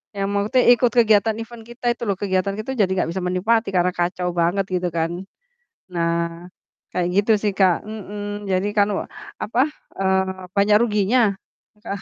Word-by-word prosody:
Yang 195 0 -1
mau 200 0 +1
te 255 - +3
ikut 240 0 +2
kegiatan 220 -2 +3
event 230 +1 -8
kita 240 +1 -11
itu 235 - -27
loh 200 - +1
kegiatan 195 0 -1
kita 215 +5 -4
jadi 190 -2 +3
nggak 180 - 0
bisa 190 - -3
menikmati 195 +5 +1
karena 180 0 +3
kacau 180 0 -1
banget 180 +3 +1
gitu 180 0 0
kan. 165 0 -1 0.8
Nah, 170 +1 -1 0.4
kayak 175 -1 -1
gitu 220 - +2
sih, 205 0 -1
Kak. 185 -2 +2
Mhm, 205 -1 -6
jadi 185 +1 +1
kan 205 -1 +3
wa - - -3 0.3
apa, 235 +3 -1 0.4
eee, 190 -1 0
banyak 205 +1 +5
ruginya, 210 -1 +2 0.5
ka 200 - -3
200 Hz, 170 wpm, -22 LUFS, 180-215 Hz, 0.8 s, banyak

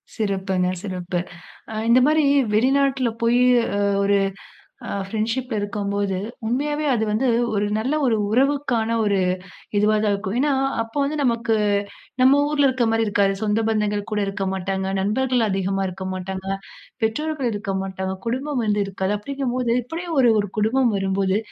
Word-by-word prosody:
சிறப்புங்க, 190 -3 0 0.2
சிறப்பு. 180 -3 -3 0.5
அ - - -6 0.2
இந்த 240 +2 +6
மாரி 305 +1 +3 0.3
வெளிநாட்ல 265 +2 +2
போய் 235 +1 +3 0.4
அ - - 0 0.3
ஒரு 200 0 +3 0.7
அ - - -4 0.2
ஃப்ரண்ட்ஷிப்ல 230 +4 -2
இருக்கும்போது, 200 -1 -2 0.3
உண்மையாவே 295 +5 -1
அது 225 -3 +1
வந்து 230 +5 +1 0.3
ஒரு 205 0 +1
நல்ல 255 +6 -1
ஒரு 235 -3 +3 0.2
உறவுக்கான 250 -3 +1
ஒரு 200 -2 +2 0.6
இதுவா 210 +1 +3
தான் 210 - +2
இருக்கும். 200 +1 -3
ஏன்னா, 290 +1 +2 0.3
அப்போ 225 +5 -6
வந்து 295 +2 -2
நமக்கு 230 -2 +1 0.7
நம்ம 270 +2 +6
ஊர்ல 290 -1 +3
இருக்க 260 -2 +1
மாரி 225 0 +2
இருக்காது. 200 -1 +2
சொந்த 215 +1 +1
பந்தங்கள் 210 -1 -1
கூட 210 - +1
இருக்க 195 0 -3
மாட்டாங்க, 190 0 -2
நண்பர்கள் 245 +4 +1
அதிகமா 195 0 -1
இருக்கமாட்டாங்க, 190 +1 -5 0.6
பெற்றோர்கள் 275 +3 -1
இருக்கமாட்டாங்க, 190 -2 -3
குடும்பம் 260 +2 -1
வந்து 210 -1 +1
இருக்காது. 195 +1 -2
அப்டிங்க 275 +5 -4
போது 250 -2 0
இப்டியே 330 +8 -6
ஒரு, 245 -3 +5
ஒரு 205 - -3
குடும்பம் 235 +3 +2
வரும்போது, 195 0 0
220 Hz, 145 wpm, -22 LUFS, 195-255 Hz, 0.7 s, இந்த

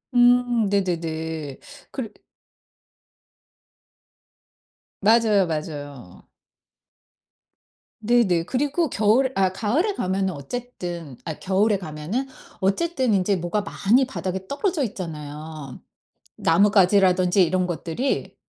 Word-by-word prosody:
음 245 -3 +4
네네네. 160 -6 -2 0.3
그래 245 -6 -4 2.9
맞아요, 215 -2 +4
맞아요. 145 - -6 1.7
네네. 215 -7 +3
그리고 290 - 0
겨울 235 +5 +2
아 190 -1 +2
가을에 265 - 0
가면은 190 0 -1
어쨌든 170 - -6
아 160 -2 -5
겨울에 200 +2 +2
가면은 165 - -4 0.3
어쨌든 260 - +1
인제 195 0 +2
뭐가 175 +5 -1
많이 225 +5 +2
바닥에 190 -7 -4
떨어져 330 +1 -1
있잖아요. 155 - -7 0.6
나뭇가지라든지 190 0 +4
이런 185 +2 0
것들이. 175 - -3
190 Hz, 215 characters per minute, -23 LUFS, 165-235 Hz, 2.9 s, 음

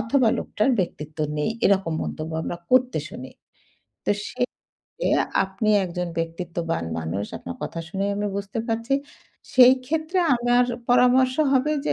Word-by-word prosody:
অথবা 230 +2 +2
লোকটার 215 +6 0
ব্যক্তিত্ব 155 -3 -5 0.2
নেই।" 150 - 0 0.2
এরকম 190 -4 +2
মন্তব্য 155 +1 -5
আমরা 175 - -4
করতে 255 0 +3
শুনি। - - -9 0.8
তো - - +2 0.2
সেই 250 0 -1 0.3
ক্ষেত্রে - - -5 0.4
আপনি 195 +3 -3 0.2
একজন 180 0 -3
ব্যক্তিত্ববান 165 - -3
মানুষ। 80 +5 -3
আপনার 85 - -7
কথা 165 - -4
শুনেই 195 +2 -1
আমি 205 0 -1
বুঝতে 200 +2 -4
পারছি। 230 +4 0 0.6
সেই 255 -1 +8
ক্ষেত্রে 320 +5 -1 0.2
আমার 245 +1 +3 0.3
পরামর্শ 250 +1 +5 0.2
হবে 270 +3 +3
যে - - +2
210 Hz, 140 wpm, -24 LUFS, 170-250 Hz, 0.8 s, সেই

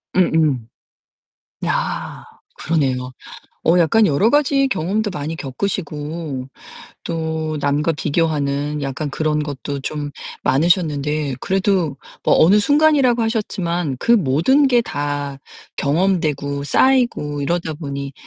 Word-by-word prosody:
음음. 155 -9 +2 1.0
아 - - -2 0.3
그러네요. 130 -6 -1 0.5
어 170 +2 +5
약간 210 +6 +4
여러 165 +8 +3
가지 280 -2 +3
경험도 205 +1 -1
많이 160 0 -4
겪으시고 150 -2 -4 0.6
또 160 -1 -3
남과 145 +3 +1
비교하는 150 -2 -1
약간 140 +2 -3
그런 150 +1 -1
것도 145 -1 -5
좀 145 +1 -4 0.3
많으셨는데 150 -3 +1
그래도 190 -7 0 0.3
뭐 - - +4
어느 190 +6 +6
순간이라고 285 -2 +3
하셨지만 180 - -1
그 235 - +1
모든 200 - +3
게 245 -2 +4
다 145 -6 -3 0.4
경험되고 145 -3 0
쌓이고 235 - +2
이러다 165 +2 -1
보니 140 -3 -6
155 Hz, 245 characters per minute, -19 LUFS, 145-190 Hz, 1.0 s, 어느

